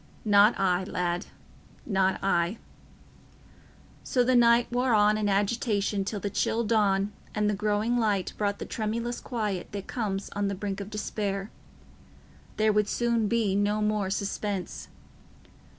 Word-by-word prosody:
"Not 205 +1 +5
I, 185 -1 +2
lad—not 185 +2 -3
I." 180 +1 +1 1.5
So 250 - +1
the 255 +1 +2
night 235 0 +4
wore 245 -1 +2
on 210 0 +4
in 215 -1 0
agitation 205 0 0
till 205 +1 -3
the 205 - -3
chill 225 +3 0
dawn 205 -2 +1 0.2
and 210 -1 +1
the 210 - +1
growing 210 +4 0
light 205 -5 0
brought 200 -1 -1
the - - -6
tremulous 230 +2 -3
quiet 210 -6 -3
that 200 -1 -5
comes 200 -5 -3
on 205 0 -1
the 200 - -2
brink 200 +1 -4
of 200 - -7
despair. 205 -1 -3 1.1
There 215 0 +3
would 210 0 +2
soon 235 -2 +1
be 225 -3 +1
no 205 +1 +1
more 210 -2 0
suspense. 200 -1 -3
210 Hz, 140 wpm, -27 LUFS, 195-220 Hz, 1.5 s, Not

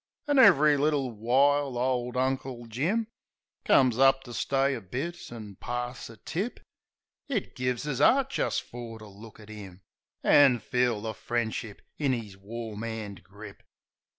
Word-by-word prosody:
An' 290 -2 +3
ev'ry 155 - +7
little 140 -3 +1
while 135 +4 +2
ole 125 0 -1
Uncle 130 -2 -2
Jim 160 - -1 0.6
Comes 130 -3 +4
up 135 0 +5
to 120 - -10
stay 135 +3 +1
a 120 - -5
bit 170 - -6
an' 105 -5 -9
pass 120 0 -5
a 115 - -12
tip. 185 - -4 0.7
It 245 -9 -3
gives 125 +2 -2
us 135 -3 -2
'eart 270 - +4
jist - - -1
fer 120 -2 -9
to 110 - -12
look 105 +2 -13
at 105 0 -12
'im, 100 -3 -10 0.4
An' 140 -4 +6
feel 120 -1 0
the 110 0 -4
friendship 115 -3 -3 0.2
in 140 -4 +2
'is 105 -5 -7
warm 110 +2 -7
'and 110 -4 -6
grip. 105 +1 -12
125 Hz, 150 wpm, -28 LUFS, 110-140 Hz, 0.7 s, ev'ry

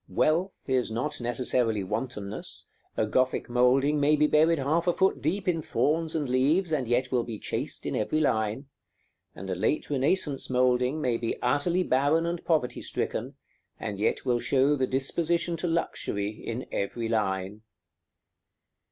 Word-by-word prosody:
Wealth 175 +5 +1
is 130 -3 +1
not 125 +5 -3
necessarily 120 -3 +1
wantonness: 105 0 -5 0.3
a - - +2
Gothic 130 +4 0
moulding 135 +4 +3
may 145 +1 +4
be 150 0 +3
buried 160 +2 +4
half 155 +5 0
a 175 - +4
foot 190 +2 +1
deep 185 +7 -1
in 165 -3 +1
thorns 160 +2 0
and 150 -3 -1
leaves, 145 +8 +2
and 135 -6 0
yet 125 +2 +1
will 125 -2 +2
be 115 -2 -6
chaste - - -4
in - - -2
every 155 - 0
line; 110 -2 0 0.7
and 95 - -8
a 95 - -1
late 110 +12 -1
Renaissance 145 +1 0
moulding 125 +3 +2
may 125 -5 +1
be 115 -1 -3
utterly 145 +8 +2
barren 145 +3 +2
and 170 0 -3
poverty 155 -7 0
stricken, - - -3 0.4
and 100 -1 -5
yet 105 - 0
will 120 -2 +2
show 140 +3 +2
the 130 -2 0
disposition 170 +6 0
to 175 - -2
luxury 105 -11 -1
in 115 +3 -6
every 115 +3 -2
line. 100 -2 -1
130 Hz, 160 wpm, -27 LUFS, 120-155 Hz, 0.7 s, may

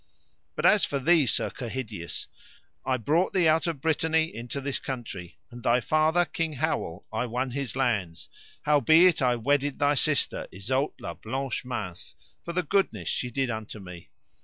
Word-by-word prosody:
But - - -2
as - - +6
for 140 - 0
thee, 150 +1 +4
Sir - - +1
Kehydius, 110 - -5 0.6
I 130 -1 +1
brought 155 - +1
thee 180 -3 +3
out 160 +2 +3
of 160 -5 -3
Brittany 160 +1 +1
into 120 +5 -5
this 140 0 -3
country, 110 - -6
and 120 - -10
thy 120 +2 +3
father, 155 +5 +2
King 165 -2 -2
Howel, 130 - -2
I 115 +3 -1
won 125 +2 -2
his 135 -1 -3
lands, 105 -11 -1 0.4
howbeit 160 +3 +5
I 125 -2 +3
wedded 140 +4 +1
thy 145 0 +3
sister 150 +1 +1
Isoud 130 +9 -1
la 85 - -5
Blanche 130 +8 -4
Mains 90 -8 -5 0.3
for 170 - -5
the 180 +1 0
goodness 145 - 0
she 125 - -1
did 130 0 -1
unto 110 -1 -6
me. 90 -3 -11
130 Hz, 165 wpm, -27 LUFS, 115-155 Hz, 0.6 s, as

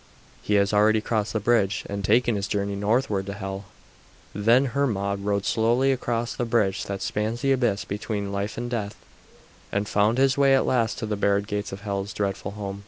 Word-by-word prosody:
"He 105 - 0
has 100 0 +2
already 110 +1 +4
crossed 110 -1 -1
the 110 - 0
bridge 105 -3 +1
and 100 0 -4
taken 115 +3 +3
his 100 0 -2
journey 100 -1 -1
northward 105 -1 0
to 100 - -4
Hel." 95 0 -6 0.7
Then 115 +6 +4
Hermod 100 -8 0
rode 100 0 -1
slowly 120 +4 +2
across 120 -2 -1
the - - -2
bridge 110 -5 +1
that 100 -1 -4
spans 110 +3 -2
the 135 -1 +2
abyss 120 -7 +1
between 100 0 -3
life 100 +1 -3
and 120 +1 -3
death, 110 -4 -3 0.8
and 100 0 -1
found 105 +4 +2
his 135 0 +3
way 135 -1 +5
at 135 - +2
last 115 -4 +1
to 110 - -3
the 105 -1 -2
barred 100 0 +1
gates 105 -1 -3
of 95 +1 -7
Hel's 100 -1 -3
dreadful 100 -1 -3
home. 100 -1 -5
105 Hz, 195 wpm, -25 LUFS, 100-115 Hz, 0.8 s, way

